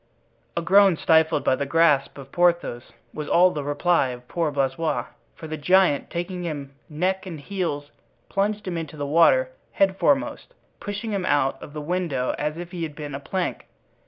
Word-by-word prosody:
A 170 - 0
groan, 195 0 +5
stifled 160 0 +3
by - - +3
the 140 +1 -3
grasp 145 -3 +3
of 135 -1 -11
Porthos, 170 -8 +1 0.2
was 150 -1 -5
all 180 +1 +5
the 150 -3 -4
reply 145 +1 +2
of 125 -1 -8
poor 165 +1 -1
Blaisois, 140 -1 -1 0.3
for - - -10
the 155 0 -5
giant, 180 -1 +3
taking 180 +1 -4
him 145 -5 -5 0.2
neck 185 +5 -1
and 165 -4 -6
heels, 145 -4 -4 0.4
plunged 205 +1 -1
him 175 -2 -2
into 155 -2 -7
the 145 - -3
water - - +4 0.3
headforemost, 270 - +1 0.2
pushing 205 +2 -5
him 200 -3 -1
out 135 -4 +1
of 145 - -10
the 150 - -5
window 155 -6 -1
as 150 +1 -2
if 175 0 -7
he 180 -2 -6
had 155 -3 -4
been 150 -2 -7
a 135 - -4
plank. 180 +5 -3
165 Hz, 180 wpm, -24 LUFS, 145-185 Hz, 0.4 s, groan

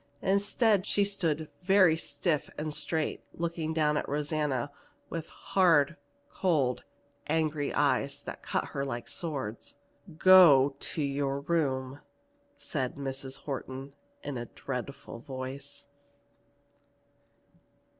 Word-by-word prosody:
Instead 205 +1 +2
she 205 - +3
stood 165 -6 -1
very 185 -3 +5
stiff 160 -1 -1
and 150 0 -3
straight, 160 +1 -1
looking 165 -1 -3
at 150 -1 +1
Rosanna 145 -2 -1 0.4
with 165 -1 -4
hard, 170 -5 +3 0.3
cold, 150 - 0 0.4
angry 155 -2 0
eyes 140 -1 +1
that - - -7
cut - - -2
her 140 - -3
like 120 -4 -4
swords. 135 -8 -5 0.4
"Go 160 -8 +8
to 155 - -1
your 140 0 -1
room!" 140 -4 -1 0.6
said 135 - -3
Mrs. 135 -1 -4
Horton 135 0 -6 0.3
in 140 -4 -4
a 120 - -5
dreadful 130 -1 -6
voice. 135 +1 -7
145 Hz, 105 wpm, -30 LUFS, 135-165 Hz, 0.6 s, Go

